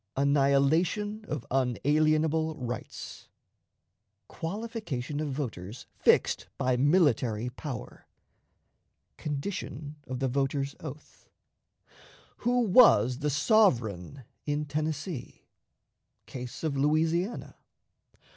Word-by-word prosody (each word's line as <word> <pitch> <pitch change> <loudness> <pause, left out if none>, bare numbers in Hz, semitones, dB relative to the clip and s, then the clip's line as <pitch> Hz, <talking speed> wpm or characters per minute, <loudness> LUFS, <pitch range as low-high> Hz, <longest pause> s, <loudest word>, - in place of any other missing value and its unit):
Annihilation 145 +10 +2
of 145 -6 -4
Unalienable 155 +5 +2
Rights. 125 -4 -7 1.0
Qualification 170 - -4
of 155 -1 -2
Voters 120 -6 -5
fixed - - +2
by 130 0 +1
Military 125 - +2
Power. 130 -1 -8 1.1
Condition 150 -1 -5
of 130 0 -4
the 135 +1 0
Voter's 135 +1 -1
Oath. 150 -1 -10 1.1
Who 245 +1 +1
was 180 - +6
the 150 0 0
Sovereign 135 - +2 0.2
in 145 +1 0
Tennessee? 155 0 -4 0.8
Case 125 +2 -8
of 155 -3 -1
Louisiana. 160 - 0
145 Hz, 80 wpm, -29 LUFS, 130-160 Hz, 1.1 s, was